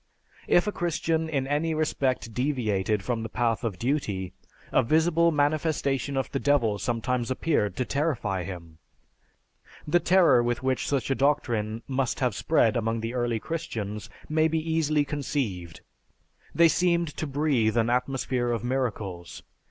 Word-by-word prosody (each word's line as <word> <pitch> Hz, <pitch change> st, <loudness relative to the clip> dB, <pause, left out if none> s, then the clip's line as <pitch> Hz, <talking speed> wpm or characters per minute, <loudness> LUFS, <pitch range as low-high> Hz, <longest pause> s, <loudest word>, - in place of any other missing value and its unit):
If 175 Hz, -, +4 dB
a 210 Hz, -, -1 dB
Christian 165 Hz, -2 st, -1 dB
in 135 Hz, -4 st, -1 dB
any 150 Hz, +3 st, 0 dB
respect 135 Hz, -7 st, -1 dB
deviated 110 Hz, -6 st, 0 dB
from 120 Hz, -2 st, -2 dB
the 110 Hz, -, -5 dB
path 115 Hz, +1 st, 0 dB
of 110 Hz, -6 st, -2 dB
duty, 105 Hz, -8 st, -2 dB, 0.4 s
a -, -, +4 dB
visible 160 Hz, +5 st, +3 dB
manifestation 145 Hz, -3 st, 0 dB
of 135 Hz, -, -2 dB
the 135 Hz, -, -1 dB
devil 120 Hz, -9 st, +2 dB
sometimes 120 Hz, +1 st, -1 dB
appeared 130 Hz, -, 0 dB
to 130 Hz, -, -1 dB
terrify 120 Hz, -, -1 dB
him. 85 Hz, -3 st, -9 dB, 1.1 s
The 175 Hz, +4 st, +4 dB
terror 175 Hz, -9 st, +5 dB
which 120 Hz, +2 st, -1 dB
such 140 Hz, -1 st, -1 dB
a -, -, +5 dB
doctrine 120 Hz, -6 st, 0 dB
must 130 Hz, -1 st, -1 dB
have 125 Hz, -4 st, +1 dB
spread 115 Hz, -1 st, +2 dB
among 115 Hz, -1 st, -1 dB
the 115 Hz, +2 st, -4 dB
early 120 Hz, -2 st, 0 dB
Christians 110 Hz, -10 st, -5 dB, 0.2 s
may 155 Hz, +1 st, +2 dB
be 160 Hz, 0 st, -1 dB
easily 155 Hz, -2 st, +1 dB
conceived. 130 Hz, -, -3 dB, 0.7 s
They 170 Hz, 0 st, +7 dB
seemed 170 Hz, 0 st, +2 dB
to 155 Hz, -, -2 dB
breathe 135 Hz, -6 st, +1 dB
an 115 Hz, 0 st, +2 dB
atmosphere 125 Hz, -1 st, 0 dB
of 115 Hz, -2 st, -2 dB
miracles. 100 Hz, -10 st, -3 dB
130 Hz, 145 wpm, -26 LUFS, 115-150 Hz, 1.1 s, They